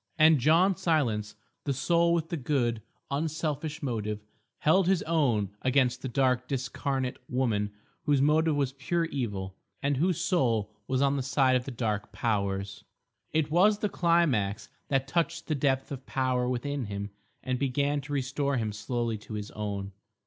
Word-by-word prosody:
And 155 -1 +6
John 170 +8 +4
Silence, 130 - 0 0.3
the 140 - 0
soul 170 +5 +3
with 165 -1 -1
the - - -2
good, 120 -6 0 0.3
unselfish 155 +1 -2
motive, 105 -5 -2 0.3
held 175 +4 +3
his 190 -2 +3
own 125 - +1
against 130 -1 +2
the 130 - -4
dark 125 0 +1
discarnate 135 0 -2
woman 110 -5 0 0.3
whose 145 -2 +3
motive 155 +2 +3
was 140 -2 0
pure 165 +5 -1
evil, 105 - -3 0.2
and 140 -1 0
whose 175 +3 +1
soul 120 - +1
was 130 +1 +1
on 140 0 +2
the - - 0
side 130 0 +3
of 125 0 0
the - - -5
Dark 105 -4 -2
Powers. 100 -3 -2 0.5
It 155 -1 0
was 200 +6 +5
the 210 0 -1
climax 150 - +1 0.2
that 135 -1 +1
touched 170 +2 -1
the 155 - -1
depth 135 -2 0
of 135 -1 -7
power 130 -2 0
within 130 +1 -2
him 100 0 -5 0.3
and 130 -1 -1
began 140 +2 +1
to 145 +2 -7
restore 140 +1 0
him 110 -3 -1
slowly 115 +1 -2
to 105 +1 -8
his 105 -1 -5
own. 100 -2 -4
135 Hz, 165 wpm, -29 LUFS, 115-155 Hz, 0.5 s, And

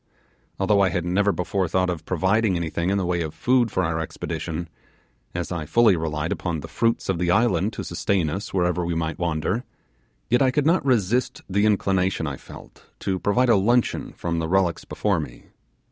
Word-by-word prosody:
Although 100 +1 +3
I 95 - +4
had 90 -1 -2
never 100 +3 +2
before 95 0 -1
thought 90 +2 +1
of 80 -2 -6
providing 95 +3 +1
anything 85 +1 -1
in 100 - +1
the 95 - 0
way 85 -1 0
of 80 -2 -4
food 125 -2 +2
for 95 - 0
our 80 -1 -1
expedition, 80 +1 -4 0.7
as 90 0 -3
I 85 -3 -3
fully 115 -1 +5
relied 80 0 -2
upon 85 -4 -2
the - - -8
fruits 115 0 0
of 95 -3 0
the 90 -1 0
island 100 -1 +2
to - - -5
sustain 85 0 0
us 95 +7 -4
wherever 90 -1 +1
we 85 0 -2
might 80 +1 -2
wander, 85 +6 -1 0.6
yet 120 +3 +2
I 130 - +5
could 145 +2 0
not 170 +2 +3
resist 125 -2 +1
the 100 +3 +2
inclination 95 -4 +1
I 70 -3 -4
felt - - -14 0.2
to 95 -1 -1
provide 120 +7 +2
luncheon 115 +3 +2
from 85 -1 -3
the 80 - -2
relics 90 -3 +1
before 100 -5 0
me. 65 -6 -8
95 Hz, 190 wpm, -24 LUFS, 85-105 Hz, 0.7 s, fully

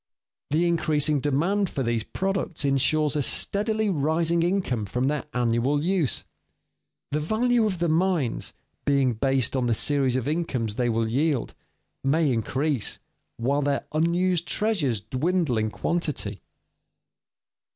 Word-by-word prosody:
The 165 +4 +2
increasing 155 -3 +1
demand 170 +8 +1
for 135 - -2
these 115 -1 0
products 190 - -2
insures 145 +2 +2
a 150 - +1
steadily 215 - 0
rising 165 +2 +1
income 170 - 0
from 125 +5 -2
their 150 +2 -1
annual 125 +4 +1
use. 175 -6 0 0.9
The 150 - 0
value 225 +7 +2
of 190 -3 -2
the 170 0 0
mines, 165 -5 0 0.3
being 140 -3 +2
based 135 +2 +1
on 125 -2 +1
the 115 - +2
series 135 0 +2
of 130 0 -1
incomes 145 -9 -1
they 120 +2 0
will 115 0 +1
yield, 140 +2 0 0.5
may 145 0 +2
increase 130 +3 -1 0.4
while 140 +5 +1
their 140 -1 0
unused 170 +2 +1
treasures 160 - 0
dwindle 130 - 0
in 110 0 0
quantity. 145 - -2
145 Hz, 130 wpm, -25 LUFS, 130-170 Hz, 0.9 s, The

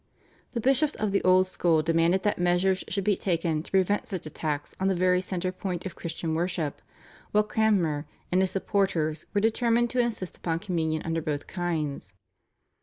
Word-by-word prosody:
The 235 - -1
bishops 270 +5 +2
of 215 -1 -1
the 195 - +1
old 185 0 +5
school 170 -4 +2
demanded 165 +3 +2
that 205 -3 0
measures 180 +2 +2
should 195 +1 -2
be 205 +1 +3
taken 165 -4 0
to - - -12
prevent 195 +2 +1
such 185 -6 -5
attacks 150 -1 -3
on 190 - +1
the 190 - +2
very 180 0 +3
centre 185 -1 -2
point 185 -1 -4
of 190 - -5
Christian 165 -1 -4
worship, 165 -3 -2 0.5
while 210 0 +5
Cranmer 190 -9 +1 0.2
and 185 +1 +3
his 190 - +2
supporters 180 -6 0
were 205 - +3
determined 235 +2 +2
to 255 - 0
insist 230 -7 -1
upon 165 -2 -1
Communion 165 -4 -1
under 165 0 -1
both 150 -2 -3
kinds. 155 - -3
180 Hz, 180 wpm, -27 LUFS, 165-200 Hz, 0.5 s, old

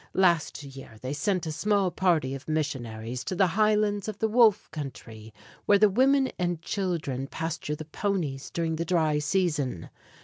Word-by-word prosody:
Last 170 -5 +2
year 135 -5 -11
they 130 +4 -4
sent 180 +4 0
a 160 - -3
small 200 +2 +1
party 170 -7 +1
of 135 -1 -8
missionaries 125 -6 -3
to 185 - -3
the 190 - +4
highlands 210 -1 +2
of 215 -2 -4
the 220 - +1
Wolf 220 -2 +4
country, 115 -7 -8 0.4
where 205 - +6
the 210 0 +5
women 265 +4 +3
and 175 -2 -1
children 165 -8 -2
pasture 160 -1 -4
the 155 - -8
ponies 160 -5 -2
during 165 -1 -2
the 165 - -1
dry 160 -4 +2
season. 150 - -1
165 Hz, 165 wpm, -27 LUFS, 140-200 Hz, 0.4 s, where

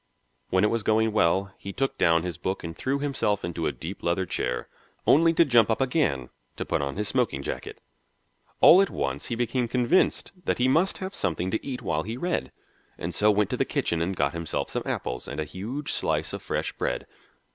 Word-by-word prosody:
When 95 +1 +3
it 105 - +3
was 115 -1 0
going 110 +1 +2
well, 100 -1 +2
he 100 - -6
took 135 +4 -1
down 85 -1 +4
his 90 -4 -5
book 95 +1 -3
and 85 -1 -6
threw 135 +8 -1
himself 140 -8 0
into 85 -1 -2
a - - +1
deep 90 +5 -7
leather 85 +2 0
chair, 60 -7 -2 0.4
only 165 +3 +6
to 170 +1 +5
jump 120 -6 +5
up 110 - +1
again 125 - 0 0.3
to - - -3
put - - 0
on 70 -1 -3
his 105 +1 -2
smoking 120 - 0
jacket. - - -5 0.8
All 185 - +9
at 195 - +2
once 65 +1 -3
he 120 - -2
became 120 +1 0
convinced 125 +9 +2
that - - +1
he 125 - +3
must 165 +9 +3
have 190 +1 -5
something 90 - -1
to 110 - -1
eat 125 -2 -5
while 85 -6 0
he 110 +7 -5
read, 175 +6 -2 0.5
and 85 +1 -4
so 105 +5 +3
went 105 -1 +2
to - - -1
the - - +3
kitchen 85 -1 -1
and 95 +3 -1
got 70 -3 +1
himself 85 -1 -3
some - - -1
apples 60 - -3
and 70 - -5
a - - 0
huge 110 - -5
slice - - 0
of - - -5
fresh - - -2
bread. - - -2
105 Hz, 215 wpm, -26 LUFS, 85-130 Hz, 0.8 s, All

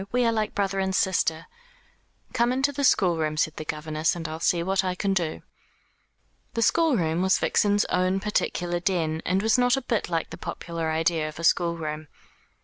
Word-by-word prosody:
We 245 0 +2
are 230 - +3
like 215 -2 -2
brother 195 -1 0
and 190 0 0
sister." 165 -4 +1 0.9
"Come 240 0 +2
into 270 +3 +1
the 280 0 -3
schoolroom," 165 - +2
said 155 +1 0
the - - -4
governess, 155 +1 -1
"and 165 -1 -5
I'll 160 +1 -6
see 170 0 +1
what 190 +1 +1
I 185 -1 -1
can 195 +1 0
do." 170 -4 -2 1.1
The 230 - +1
schoolroom 210 - +2
was 190 0 +3
Vixen's 205 0 +2
own 185 +1 +1
particular 175 -3 -1
den, 165 -3 -1
and 190 +3 +1
was 225 +3 +3
not 245 +1 +3
a - - -2
bit 230 -7 -1
like 165 -2 -2
the - - -8
popular 165 -2 -4
idea 160 0 0
of 150 - -12
a 165 - -7
schoolroom. 165 -3 0
180 Hz, 185 wpm, -25 LUFS, 160-205 Hz, 1.1 s, are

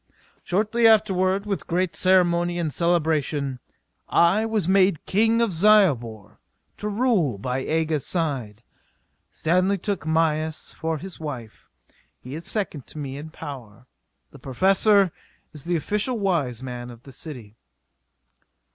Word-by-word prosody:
Shortly 215 +5 +2
afterward, 200 -3 +3
with 200 -2 -3
great 180 +1 -1
ceremony 175 -2 +2
and 160 -4 -2
celebration, 155 -5 0 0.5
I 195 +6 +3
was 215 -6 -1
made 190 -3 +3
King 225 +3 +2
of 230 -3 +1
Zyobor, 130 - +2 0.4
to 210 - -3
rule 205 - +1
by 125 +5 -2
Aga's 155 0 -1
side. 130 - -3 0.7
Stanley 185 +4 +1
took 200 -3 -3
Mayis 160 -1 0
for 160 0 -3
his 185 +3 -9
wife. 130 -8 -8 0.5
He 125 - -10
is 160 +3 -6
second 185 - -3
to - - -11
me 140 -3 -5
in 150 +3 -8
power. 125 -8 -10 0.5
The - - -14
Professor 195 - +3 0.4
is 150 -3 -8
the 175 0 0
official 210 - 0
wise 150 - -1
man 125 -1 -6
of 120 0 -13
the 135 - -13
city. 125 -6 -9
165 Hz, 130 wpm, -24 LUFS, 135-195 Hz, 0.7 s, afterward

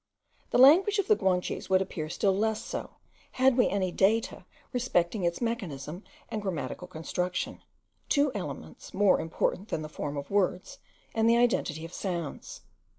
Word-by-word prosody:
The - - +1
language 345 +11 +7
of 400 -1 0
the 430 - +6
Guanches 185 - -1
would 190 0 +5
appear 165 -5 -4
still 195 +3 +1
less 220 +2 0
so, - - -6 0.4
had 260 0 +4
we 250 - +4
any 190 -2 0
data 215 +5 +1 0.3
respecting 215 -6 0
its 170 +4 -1
mechanism 180 - -4 0.2
and 215 - -4
grammatical 180 -3 -4
construction; 180 +2 -3 0.5
two 285 -1 +3
elements 140 - -7
more 200 0 +4
important 170 +4 -1
than 155 - -3
the 155 - -6
form 145 -1 -5
of 140 - -6
words, 190 -2 0 0.3
and 225 0 +3
the 235 - +5
identity 170 -10 +1
of 165 - -10
sounds. 170 -6 -5
190 Hz, 155 wpm, -29 LUFS, 170-230 Hz, 0.5 s, language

